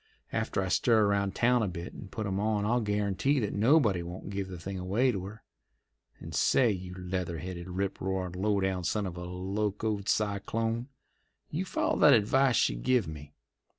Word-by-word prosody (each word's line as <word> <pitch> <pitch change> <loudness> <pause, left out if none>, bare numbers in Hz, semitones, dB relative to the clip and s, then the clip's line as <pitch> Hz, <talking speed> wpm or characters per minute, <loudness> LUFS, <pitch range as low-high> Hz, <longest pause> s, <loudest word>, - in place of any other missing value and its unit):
After 95 - -1
I - - -2
stir 110 +2 +4
around 100 -1 +1
town 125 0 +3
a 110 - +1
bit 85 -1 -6
and 95 - -10
put 110 - -4
'em 95 -1 -1
on 105 -1 0
I'll 120 +3 +2
guarantee 105 +6 +1
that 105 - -2
nobody 110 - +3
won't 90 +3 -7
give 100 -1 -3
the 95 -1 -7
thing 95 +2 -5
away 105 +8 +2
to 95 -5 -4
her. 105 +4 -10 0.8
And - - -9
say, 120 -4 +3
you 90 -2 -6
leather 90 -2 -3
headed, 90 +2 -6
rip 95 +2 -3
roarin', 95 -1 -2
low 100 +2 +1
down 95 -1 -1
son 105 +4 0
of 90 -2 -5
a 90 - -6
locoed 100 +3 -2
cyclone, 115 +3 -1 0.6
you - - -2
follow - - 0
that - - +8
advice 125 +4 +3
she - - +3
give 105 - +1
me! 75 -2 -9
100 Hz, 185 wpm, -30 LUFS, 90-110 Hz, 0.8 s, that